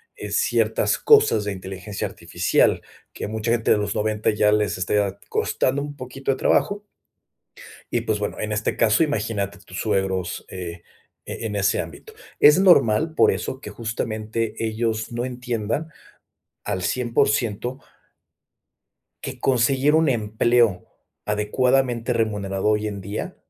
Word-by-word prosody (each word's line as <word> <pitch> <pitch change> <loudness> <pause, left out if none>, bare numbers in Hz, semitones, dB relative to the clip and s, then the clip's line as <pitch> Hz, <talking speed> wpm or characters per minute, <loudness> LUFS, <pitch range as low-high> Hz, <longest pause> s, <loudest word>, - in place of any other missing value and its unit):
eh, - - -7
ciertas - - +1
cosas 430 - +5
de 105 - -2
inteligencia 95 +1 -5
artificial - - +1 0.3
que - - -5
mucha 110 +1 -2
gente 115 -1 +1
de - - +5
los 105 0 -2
90 105 0 0
ya 105 0 +3
les 105 -2 +1
está 100 +2 0
costando 135 +2 0
un 145 0 -6
poquito 135 +1 -4
de 130 - -2
trabajo 205 +8 +1 1.1
y, - - +1
pues, 110 -1 -1
bueno, 105 - -3
en 110 0 -2
este 105 +1 -1
caso 110 +8 +3
imagínate 105 -10 -2
tus 90 -1 -10
suegros, 95 -4 -1
eh, 85 -2 -7 0.4
en 110 -2 -5
ese 100 -2 +2
ámbito. 80 -1 -9 0.3
Es 150 +3 +7
normal 160 - +4
por - - +5
eso 130 - -4
que 105 - -8
justamente 110 0 -3
ellos 110 0 -2
no 120 +1 -2
entiendan 125 +3 -3 0.8
al 95 - -2
100% 120 +2 0 1.5
que - - -6
conseguir 135 +3 +2
un 160 -1 +4
empleo 115 -3 +2 0.4
adecuadamente 120 +3 +1
remunerado 105 -3 -1
hoy 105 0 +1
en 100 -2 -6
día 100 +3 -5
110 Hz, 135 wpm, -23 LUFS, 105-125 Hz, 1.5 s, Es